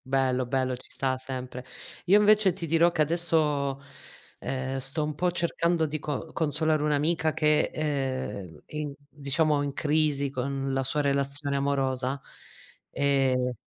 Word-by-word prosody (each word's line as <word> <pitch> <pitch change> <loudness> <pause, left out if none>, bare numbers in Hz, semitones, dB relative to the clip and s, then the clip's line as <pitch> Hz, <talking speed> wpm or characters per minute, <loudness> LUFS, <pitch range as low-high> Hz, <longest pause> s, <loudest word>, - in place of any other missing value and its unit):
Bello 130 -1 +1
bello 130 0 0
ci 125 - -13
sta 130 0 -1
sempre. 130 -1 -6 0.4
Io 190 +3 +6
invece 210 -2 +5
ti 170 - -5
dirò 165 +2 +4
che 155 -3 +2
adesso, 150 -4 +1 0.6
ehm, 130 0 -3
sto 135 +4 0
un 150 0 -2
po' 180 +5 0
cercando 170 -1 +1
di 155 0 -3
co 150 +2 -4
consolare 155 0 +1
un'amica 155 +2 +1
che, 155 -1 +3
ehm, 130 - -3
è - - -12
in 150 -2 -3
diciamo 145 +1 0
in 140 -1 -2
crisi 145 -2 +1
con 135 +1 -2
la 135 - +1
sua 150 +3 0
relazione 140 0 0
amorosa, 135 -1 0 0.7
e 130 -3 +1
140 Hz, 145 wpm, -27 LUFS, 135-155 Hz, 0.7 s, Io